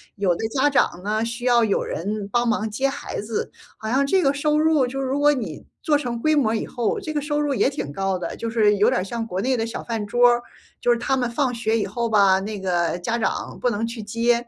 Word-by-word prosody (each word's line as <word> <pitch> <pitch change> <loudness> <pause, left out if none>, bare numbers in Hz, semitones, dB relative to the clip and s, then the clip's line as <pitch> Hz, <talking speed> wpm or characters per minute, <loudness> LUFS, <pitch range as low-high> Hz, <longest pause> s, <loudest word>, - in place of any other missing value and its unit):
有 195 -4 +1
的 220 - -2
家 265 +4 +2
长 195 -10 +1
呢， 215 +2 0
需 235 +1 -4
要 240 -2 +4
有 210 -3 +1
人 200 +4 -3
帮 240 +2 +1
忙 230 -2 0
接 270 +5 0
孩 270 - -5
子， 215 +1 -3 0.3
好 220 - -7
像 275 +3 +2
这 375 +4 +3
个 275 -1 +3
收 300 +1 +1
入 310 -4 +3
就 270 +2 -5
如 270 +1 -1
果 295 0 +5
你 205 - -5 0.2
做 300 - +3
成 245 -5 -2
规 310 +5 +2
模 230 -6 +2
以 - - -2
后， 240 -3 -2
这 310 - -5
个 295 - -1
收 295 0 -1
入 290 -2 0
也 265 - +2
挺 280 - -5
高 195 +2 -1
的， 180 - -5
就 230 - -4
是 210 -3 +3
有 205 - +4
点 185 - +1
儿 - - -3
像 225 +3 -4
国 185 -2 -3
内 260 +4 +1
的 225 -1 -1
小 225 - -6
饭 225 -3 -3
桌 245 +3 +5
儿。 240 0 +1 0.4
就 245 - +3
是 240 - +3
他 255 +3 0
们 245 -2 0
放 255 +1 0
学 230 -1 0
以 - - 0
后 230 +3 -2
吧， 195 -3 +5
那 205 +1 -5
个 175 -2 0
家 230 +7 -2
长 - - -2
不 250 - +2
能 225 0 -1
去 230 -1 -6
接。 235 +3 0
235 Hz, 280 characters per minute, -23 LUFS, 210-265 Hz, 0.4 s, 果